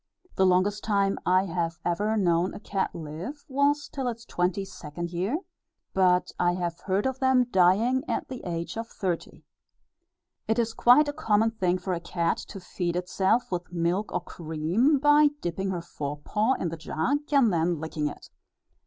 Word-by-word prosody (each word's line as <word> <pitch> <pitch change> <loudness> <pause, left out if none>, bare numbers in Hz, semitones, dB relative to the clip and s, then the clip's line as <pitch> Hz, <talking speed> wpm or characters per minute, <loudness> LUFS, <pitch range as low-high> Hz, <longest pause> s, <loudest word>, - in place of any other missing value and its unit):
The 190 - +4
longest 190 +3 +2
time 200 -2 +1
I 185 +1 +4
have 170 -2 -2
ever 205 +6 0
known 175 -2 +1
a - - -7
cat 200 -2 -2
live, 170 - -7
was 285 +2 +1
till 265 -3 -4
its 235 -1 -4
twenty 180 +1 -1
second 170 -2 -7
year, 190 - -1 0.6
but 180 -1 +3
I 175 0 +3
have 175 -1 -3
heard 195 +1 0
of 265 0 -1
them 260 -1 +4
dying 200 +8 +3
at - - -1
the 255 -2 -7
age 170 +3 -4
of 225 0 -4
thirty. 180 -6 -4 1.0
It 220 - +1
is 230 -1 0
quite 250 +7 +5
a 290 - -2
common 225 -7 +2
thing 185 -5 0
for 185 0 -3
a 170 - -2
cat 170 0 -1
to 195 - -8
feed 175 -1 -3
itself 190 +6 +1
with 175 -1 -4
milk 175 +4 -1
or 180 - -1
cream, 170 - 0
by 295 +2 +6
dipping 190 - -3
her 180 -2 -2
forepaw 170 - -1
in 175 - -1
the 165 - -6
jug, 160 - -1
and 265 -8 +4
then 170 0 +1
licking 155 -1 -2
it. - - -9
185 Hz, 175 wpm, -27 LUFS, 175-230 Hz, 1.0 s, by